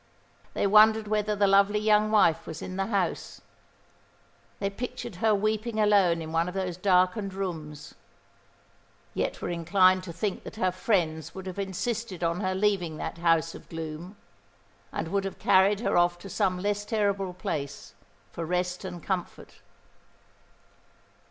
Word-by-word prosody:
They -, -, +1 dB
wondered 215 Hz, +1 st, +5 dB
whether 210 Hz, 0 st, 0 dB
the 200 Hz, 0 st, +3 dB
lovely 200 Hz, +1 st, +4 dB
young 215 Hz, 0 st, +3 dB
wife 170 Hz, -7 st, +3 dB
was 160 Hz, -, -6 dB
in 185 Hz, -, -6 dB
the 195 Hz, 0 st, -1 dB
house. 195 Hz, -6 st, -2 dB, 1.2 s
They 195 Hz, 0 st, -2 dB
pictured 240 Hz, -2 st, -6 dB
her 215 Hz, +2 st, +3 dB
weeping 215 Hz, +2 st, -1 dB
alone 195 Hz, -6 st, +3 dB
in 160 Hz, -, -7 dB
one 165 Hz, +1 st, +1 dB
of 180 Hz, -, -6 dB
those 185 Hz, -2 st, -2 dB
darkened 185 Hz, +2 st, +1 dB
rooms; 160 Hz, -6 st, -6 dB, 1.2 s
yet -, -, -2 dB
were -, -, -2 dB
inclined 185 Hz, +2 st, +3 dB
to 175 Hz, -, -6 dB
think 190 Hz, +4 st, -3 dB
that -, -, -9 dB
her 185 Hz, -4 st, +1 dB
friends 165 Hz, -5 st, -1 dB
would 190 Hz, 0 st, -7 dB
have 185 Hz, +1 st, -6 dB
insisted 200 Hz, 0 st, -3 dB
on 170 Hz, +1 st, 0 dB
her 185 Hz, -2 st, -1 dB
leaving 190 Hz, -5 st, 0 dB
that 165 Hz, -, -5 dB
house 165 Hz, -1 st, +2 dB
of -, -, -13 dB
gloom, 165 Hz, +4 st, -7 dB, 0.7 s
and 165 Hz, -, -4 dB
would 200 Hz, +2 st, 0 dB
have 195 Hz, -, -5 dB
carried 195 Hz, +2 st, +4 dB
her -, -, 0 dB
off 175 Hz, 0 st, +3 dB
to 195 Hz, +3 st, -10 dB
some 185 Hz, +1 st, +1 dB
less 205 Hz, +2 st, -1 dB
terrible 200 Hz, -3 st, 0 dB
place 140 Hz, -5 st, -5 dB, 0.4 s
for 170 Hz, -, -5 dB
rest 180 Hz, +2 st, -2 dB
and 180 Hz, -3 st, -7 dB
comfort. 185 Hz, -3 st, -5 dB
190 Hz, 155 wpm, -27 LUFS, 175-205 Hz, 1.2 s, wondered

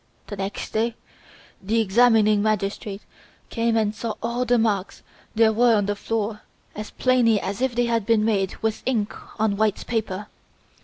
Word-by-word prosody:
The 205 Hz, -, -7 dB
next 195 Hz, +1 st, -5 dB
day, 225 Hz, +1 st, 0 dB, 0.7 s
the 220 Hz, +4 st, 0 dB
examining 215 Hz, -1 st, +4 dB
magistrate 205 Hz, -1 st, -2 dB, 0.5 s
came 230 Hz, -1 st, +1 dB
and 215 Hz, -2 st, +1 dB
saw 220 Hz, 0 st, -4 dB
all 235 Hz, +2 st, -1 dB
the 245 Hz, 0 st, +3 dB
marks 210 Hz, -4 st, -1 dB, 0.3 s
there 220 Hz, 0 st, +4 dB
were 235 Hz, +1 st, +4 dB
on 205 Hz, -2 st, +1 dB
the 205 Hz, +1 st, -1 dB
floor 215 Hz, 0 st, -3 dB, 0.3 s
as 215 Hz, 0 st, -6 dB
plainly 245 Hz, -4 st, +2 dB
as 195 Hz, +4 st, -4 dB
if 260 Hz, -2 st, 0 dB
they 245 Hz, 0 st, +2 dB
had 230 Hz, -2 st, 0 dB
been 220 Hz, -2 st, +3 dB
made 195 Hz, -4 st, 0 dB
with 220 Hz, -1 st, -1 dB
ink 220 Hz, -5 st, 0 dB, 0.3 s
on 215 Hz, -2 st, +1 dB
white 215 Hz, -1 st, 0 dB
paper. 210 Hz, -4 st, -2 dB
220 Hz, 165 wpm, -23 LUFS, 205-230 Hz, 0.7 s, examining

